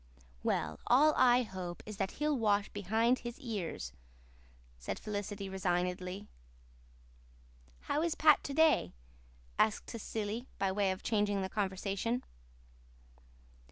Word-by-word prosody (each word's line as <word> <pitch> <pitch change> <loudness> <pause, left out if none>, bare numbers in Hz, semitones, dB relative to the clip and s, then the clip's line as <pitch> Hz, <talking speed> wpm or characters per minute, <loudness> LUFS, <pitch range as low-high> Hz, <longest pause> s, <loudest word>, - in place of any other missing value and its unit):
"Well, 75 0 -1
all 295 +5 +6
I 250 0 +5
hope 185 -5 -6
is 215 -2 -7
that 190 - -1
he'll 300 0 0
wash 210 -4 +2
behind 220 +5 +1
his 240 +2 -7
ears," 195 - -4 0.9
said 60 - -4
Felicity 205 -1 -4
resignedly. 180 +1 -2 1.5
"How 295 - -1
is 335 0 0
Pat 305 -3 +5
to 280 - -3
day?" 315 - +4 0.7
asked 215 - +2
Cecily, 225 +1 -4
by 195 -1 +1
way 200 0 +1
of 185 0 -3
changing 205 -3 +1
the 190 - -3
conversation. 200 +4 -1
205 Hz, 120 wpm, -33 LUFS, 190-240 Hz, 1.5 s, all